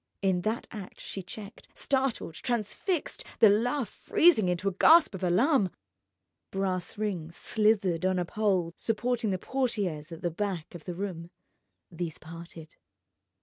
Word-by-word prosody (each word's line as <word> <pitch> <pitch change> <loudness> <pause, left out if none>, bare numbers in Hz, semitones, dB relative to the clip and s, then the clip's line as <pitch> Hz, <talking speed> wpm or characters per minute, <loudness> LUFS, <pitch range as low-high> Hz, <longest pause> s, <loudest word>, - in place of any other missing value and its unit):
In 185 -2 +2
that 220 +5 -1
act 205 -5 -8
she 195 - -6
checked, 200 +4 -10
startled, 270 - -1
transfixed, 245 - -2
the 220 - +7
laugh 240 +5 +1
freezing 270 - +3
into 180 +2 -1
a - - +3
gasp 315 - +6
of 190 - -6
alarm. 195 - +3 0.8
Brass 190 -1 -2
rings 180 -6 -3
slithered 205 -6 +1
on 185 0 +2
a 180 - 0
pole 185 -3 0
supporting 235 0 0
the 190 - 0
portières 195 - -2
at 165 - -9
the 175 - 0
back 185 -2 -3
of 170 -3 -10
the 180 - -4
room. 175 -3 -5 0.6
These 170 -2 -4
parted. 165 0 -11
195 Hz, 145 wpm, -29 LUFS, 175-225 Hz, 0.8 s, the